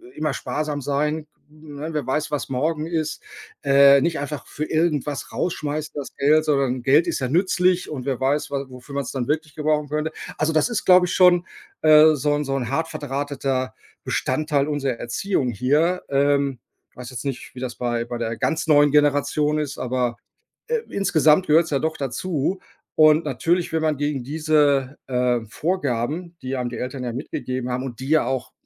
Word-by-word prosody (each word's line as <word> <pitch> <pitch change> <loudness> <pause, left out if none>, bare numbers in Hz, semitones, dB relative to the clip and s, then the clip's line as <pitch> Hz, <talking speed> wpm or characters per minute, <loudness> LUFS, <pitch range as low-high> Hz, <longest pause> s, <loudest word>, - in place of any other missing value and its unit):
immer 155 -2 -1
sparsam 150 -1 -3
sein, 150 +3 -1 0.2
ne, 150 0 -8
wer 150 -4 -2
weiß, 150 +3 -1
was 145 -2 -2
morgen 150 +4 -1
ist 160 -2 -2 0.4
äh, 140 0 +6
nicht 165 +2 0
einfach 145 0 -5
für 155 - -4
irgendwas 155 -3 -1
rausschmeißen, 155 -3 -3
das 145 -2 -6
Geld, 155 +3 +3
sondern 135 -4 +1
Geld 145 +6 +4
ist 170 - -1
ja 130 - -1
nützlich 180 +2 +2
und 130 -4 -6
wer 135 -3 -1
weiß, 140 +3 0
wa 140 -1 -2
wofür 125 +2 -11
man's 140 -3 -2
dann 125 -3 -2
wirklich 155 -1 -2
gebrauchen 150 -1 0
könnte.” 150 +1 -2 0.3
Also 155 +1 +1
das 155 - +3
ist, 235 - -2
glaube 180 -1 +6
ich, 180 - -3
schon, 180 -1 +5 0.4
äh, 155 0 +7
so 145 +1 0
'n 145 0 0
so 135 -1 -2
'n 125 -4 -2
hart 160 +5 -1
verdrahteter 140 -3 -3 0.3
Bestandteil 145 +1 0
unserer 145 -3 -1
Erziehung 130 +3 -1
hier 150 - +1
ähm, 140 -2 +1 0.3
ich - - -32
weiß 125 -1 -8
jetzt 130 - -7
nicht, 135 -2 -5
wie - - -8
das 125 -2 -4
bei 120 -1 -1
bei 120 0 -5
der 115 0 -3
ganz 160 - -1
neuen 145 -2 +5
Generation 150 +1 +2
ist, 150 -2 -4
aber, 125 -1 -1 0.5
äh, 475 0 0
insgesamt 160 -3 +3
gehört's 160 +2 +4
ja 140 - +1
doch 160 +2 -2
dazu. 150 +6 -2 0.4
Und 155 +1 +5
natürlich, 175 0 0
wenn 160 - +1
man 155 -2 0
gegen 145 -2 -2
diese, 145 -2 +1
äh, 125 -1 +1
Vorgaben, 160 +2 -2
die 130 +1 -3
einem 125 -2 -2
die 120 - -7
Eltern 130 +1 -5
ja 120 - -3
mitgegeben 130 -1 -4
haben 125 +1 -2
und 125 -3 -7
die 130 - -6
ja 155 0 +3
auch, 130 -1 -3
145 Hz, 185 wpm, -22 LUFS, 130-155 Hz, 0.5 s, äh